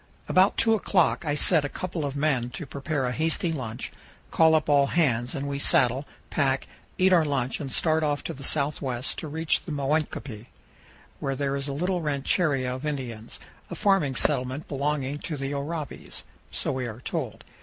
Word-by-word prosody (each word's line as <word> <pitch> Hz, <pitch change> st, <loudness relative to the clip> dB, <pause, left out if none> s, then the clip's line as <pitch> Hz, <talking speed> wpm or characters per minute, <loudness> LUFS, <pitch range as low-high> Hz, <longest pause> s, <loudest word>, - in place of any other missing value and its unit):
About 185 Hz, +2 st, +4 dB
two 225 Hz, -1 st, +4 dB
o'clock 185 Hz, -5 st, +2 dB
I 145 Hz, -1 st, 0 dB
set 155 Hz, +1 st, +4 dB
a 145 Hz, -, -2 dB
couple 170 Hz, -3 st, -4 dB
of 140 Hz, -1 st, -3 dB
men 140 Hz, -5 st, +1 dB
to 160 Hz, -, -5 dB
prepare 140 Hz, 0 st, -2 dB
a 125 Hz, -, 0 dB
hasty 160 Hz, +4 st, 0 dB
lunch, 120 Hz, -5 st, -5 dB, 0.4 s
call 160 Hz, -1 st, +5 dB
up 155 Hz, -, +1 dB
all 140 Hz, -1 st, +4 dB
hands, 125 Hz, -8 st, +1 dB
and 140 Hz, +1 st, -3 dB
we 140 Hz, 0 st, -2 dB
saddle, 130 Hz, 0 st, +3 dB, 0.2 s
pack, 135 Hz, -2 st, +1 dB, 0.3 s
eat 185 Hz, 0 st, +4 dB
our 170 Hz, -3 st, +6 dB
lunch, 135 Hz, -4 st, -1 dB
and 140 Hz, -4 st, -5 dB
start 160 Hz, +2 st, +2 dB
off 145 Hz, -2 st, 0 dB
to -, -, -4 dB
the 135 Hz, -, -10 dB
southwest 140 Hz, -3 st, +1 dB
to 160 Hz, -, -5 dB
reach 160 Hz, +2 st, 0 dB
OVER -, -, -22 dB
THE -, -, -3 dB
RIVER. 145 Hz, +2 st, +2 dB
335 -, -, -7 dB
the 110 Hz, -5 st, -7 dB
Moenkopi, 115 Hz, -, -16 dB, 0.7 s
where 135 Hz, 0 st, -2 dB
there 140 Hz, 0 st, -1 dB
is 140 Hz, 0 st, -3 dB
a 140 Hz, -, -3 dB
little 180 Hz, +4 st, 0 dB
ranchería 140 Hz, -2 st, +1 dB
of 130 Hz, +2 st, -6 dB
Indians, 125 Hz, -7 st, -5 dB, 0.3 s
a -, -, -5 dB
farming 195 Hz, -, +2 dB
settlement 130 Hz, +4 st, +1 dB
belonging 145 Hz, 0 st, -1 dB
to 155 Hz, -2 st, -4 dB
the 135 Hz, +1 st, -3 dB
Oraibis, 150 Hz, +1 st, -5 dB, 0.3 s
so -, -, -1 dB
we 130 Hz, -2 st, -2 dB
are 115 Hz, +1 st, -8 dB
told. -, -, -4 dB
145 Hz, 195 wpm, -26 LUFS, 130-155 Hz, 0.7 s, our